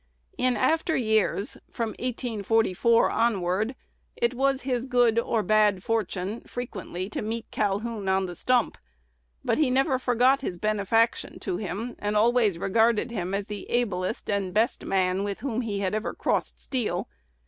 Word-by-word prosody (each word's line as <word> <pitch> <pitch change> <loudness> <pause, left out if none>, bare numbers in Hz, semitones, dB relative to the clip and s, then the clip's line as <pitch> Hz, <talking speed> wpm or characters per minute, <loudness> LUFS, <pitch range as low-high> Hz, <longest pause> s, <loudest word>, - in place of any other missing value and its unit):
In 250 -2 +1
after 320 +8 +2
years 220 -3 +1
from 230 -1 -2
1844 225 -2 +1
onward 215 +1 +1 0.4
it 235 +1 +1
was 270 +1 +1
his 250 -1 -1
good 245 -3 +3
or 230 -2 0
bad 210 -2 +3
fortune 210 -2 -2
frequently 195 -6 -6
to - - -3
meet 225 +1 -4
Calhoun 205 0 -1
on 190 0 +2
the 175 - -6
stump; 245 +6 +1 0.7
but - - +1
he 300 -4 +3
never 265 +1 +2
forgot 255 +2 +3
his 180 -9 -4
benefaction 215 +3 +1
to 365 - -2
him, 215 +5 -4
and 210 0 -2
always 225 -4 +3
regarded 225 +5 +2
him 185 -3 -2
as 200 0 -2
the 210 -1 -7
ablest 200 -7 -1
and 200 -2 -1
best 225 +4 +1
man 190 0 +1
with 200 -1 -4
whom 250 -3 -1
he 205 -4 -3
ever 210 +4 -1
had - - -21
crossed - - -1
steel. 255 -5 -2
220 Hz, 155 wpm, -26 LUFS, 200-245 Hz, 0.7 s, good